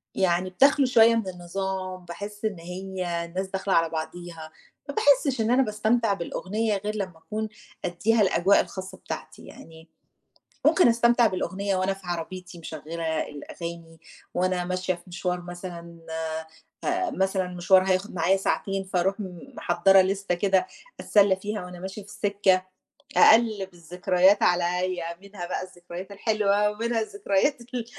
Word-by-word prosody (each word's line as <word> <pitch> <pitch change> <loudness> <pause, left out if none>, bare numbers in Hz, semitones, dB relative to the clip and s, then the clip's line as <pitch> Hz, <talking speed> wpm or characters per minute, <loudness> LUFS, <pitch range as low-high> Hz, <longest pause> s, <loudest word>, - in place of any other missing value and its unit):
يعني 185 0 +1
بتَخلو 275 +7 +4
شوية 230 -2 +6
من 225 -4 -1
النظام، 185 +1 -4
باحِس 205 +5 -7
إن 200 -6 -2
هي 180 -1 -4
الناس 185 +3 -4
داخلة 190 0 -2
على 165 -1 +3
بعضيها، 160 0 -6 0.4
ما 285 - -4
باحسّش 275 -3 +3
إن 225 +2 +1
أنا 265 +2 +5
باستمتع 215 0 +1
بالأغنية 205 +4 -2
غير 210 +2 -4
لمّا 185 -5 -4
أكون 215 +5 -4 0.4
أدّيها 210 +6 +2
الأجواء 190 0 +4
الخاصة 190 0 -7
بتاعتي - - -8
يعني 160 0 -14 0.8
ممكن 360 - +6
أستمتع 235 0 +4
بالأغنية 195 0 -1
وأنا 190 +1 0
في 195 - -15
عربيتي 175 +1 -5
مشغّلة 160 0 -4
الأغاني، 165 +2 -8 0.3
وأنا 180 0 +1
ماشية 185 0 -1
في 175 - -13
مشوار 180 0 -2
مثلًا 175 -1 -8 0.8
فمثلًا 210 - 0
مشوار 185 +1 +3
هياخُد 185 +3 0
معايا 180 +3 +3
ساعتين، 195 0 -1
فاروح 190 +2 0
م 180 -3 -6 0.2
محضّرة 195 0 +4
لِستة 195 -1 -1
كده 190 0 +2 0.3
أتسلّى 200 -2 +4
فيها 205 0 -4
وأنا 180 0 -9
ماشية 190 +3 -6
في 205 - -17
السِكَّة، 200 -3 +1 0.5
أقلِّب 215 -5 +5
الذكريات 180 +3 +2
عليّا، 175 -1 +1
منها 200 -3 -7
بقى 180 - -3
الذكريات 180 +1 -9
الحلوة 210 0 +2
ومنها 230 +2 -1
الذكريات 265 - 0
ال 240 0 -5
190 Hz, 140 wpm, -26 LUFS, 175-210 Hz, 0.8 s, شوية